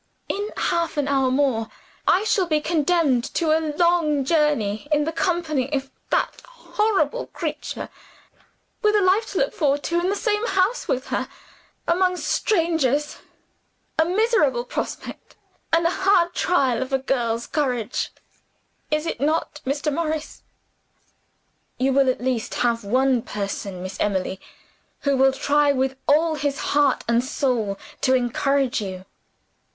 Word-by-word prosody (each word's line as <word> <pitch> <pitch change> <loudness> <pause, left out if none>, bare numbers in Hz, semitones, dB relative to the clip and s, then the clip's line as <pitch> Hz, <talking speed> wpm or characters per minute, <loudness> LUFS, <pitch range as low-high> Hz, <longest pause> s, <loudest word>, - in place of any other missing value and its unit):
In 410 +1 -2
half 340 -2 0
an 290 -1 +1
hour 270 -2 +2
more, 255 -4 +1 0.4
I 375 - +4
shall 400 -4 +1
be 310 -2 +2
condemned 310 -5 +2
to 325 -2 +2
a 320 - +1 0.2
long 335 -5 +2
journey 290 -8 +1
in 300 0 +3
the 320 - -2
company 320 -6 -1
of 270 -2 -2 0.2
that - - 0
horrible 460 -1 -1
creature - - -5 0.9
with 425 -2 +3
a 415 - +4
life 395 +5 +3
to - - -5
look - - +1
forward 290 -8 +1
to, 340 +1 0
in 355 +2 0
the 400 - 0
same 420 0 0
house 390 +3 +1
with 260 +1 -1
her, - - -2 0.6
among 365 +1 +2
strangers! 320 - 0 0.8
A - - +7
miserable 470 +6 +2
prospect, - - -6 0.4
and 335 0 +3
a 335 - +3
hard 370 -2 +3
trial 270 -11 +1
of 260 - -4
a 270 - +3
girl's 235 -3 -1
courage 250 -7 -1 0.8
is 305 +1 0
it 325 - -4
not, 305 0 0
Mr. 290 +2 -1
Morris?" 315 -1 -3 1.4
"You 265 +1 +1
will 270 -1 +4
at 255 - 0
least 250 -3 -2
have 235 -2 +1
one 255 +4 +2
person, 200 -3 -5
Miss 185 +1 -7
Emily, 190 -2 -1 0.6
who 280 -1 +1
will 265 0 +5
try 285 +2 +2
with 265 -1 0
all 315 +3 +4
his 285 -2 -1 0.2
heart 285 -2 +3
and 235 +1 +2
soul 250 -7 -1 0.2
to 260 -1 +3
encourage 260 +1 +1
you." 185 -2 -6
290 Hz, 145 wpm, -23 LUFS, 260-340 Hz, 1.4 s, A